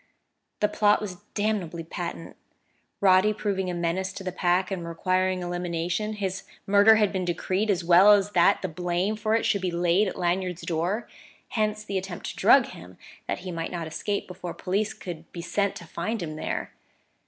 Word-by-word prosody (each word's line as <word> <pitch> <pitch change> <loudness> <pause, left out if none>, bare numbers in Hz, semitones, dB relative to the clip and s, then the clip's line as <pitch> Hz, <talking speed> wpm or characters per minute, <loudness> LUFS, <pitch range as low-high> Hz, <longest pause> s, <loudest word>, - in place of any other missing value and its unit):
The 210 - +4
plot 210 0 +3
was 195 -4 -6 0.2
damnably 200 -6 -1
patent: 170 0 -6 0.7
Roddy 190 +2 +5
proving 195 -3 -2
a 180 - -3
menace 175 +2 -1
to 195 - -7
the 185 - -3
Pack 180 +1 +1
and 175 -3 -3
requiring 185 +2 0
elimination, 175 +3 -2
his 195 -2 -3 0.2
murder 205 +2 +6
had 210 -2 +2
been 190 -1 -1
decreed 185 +4 -1
as 185 -4 +1
well 180 +4 +7
as 205 0 +2
that 190 +2 +4
the - - 0
blame 180 +4 -1
for 215 +1 0
it 225 - +1
should 200 - +1
be 185 - 0
laid 175 +4 +2
at - - -5
Lanyard's 180 0 -1
door. 175 +7 -1 0.4
Hence 215 -1 -1
the 195 -2 -2
attempt 185 -2 -7
to - - -13
drug - - +6
him, 90 +1 -12 0.3
that - - -2
he 185 0 -6
might 165 -1 -4
not 170 -2 -4
escape 200 +6 -3
before 180 -1 -7
police 200 +3 -1
could 170 -3 -8
be 170 - -6
sent 200 +3 0
to 170 - -9
find 180 +5 -3
him 155 -2 -5
there. - - -4
185 Hz, 190 wpm, -26 LUFS, 175-205 Hz, 0.7 s, well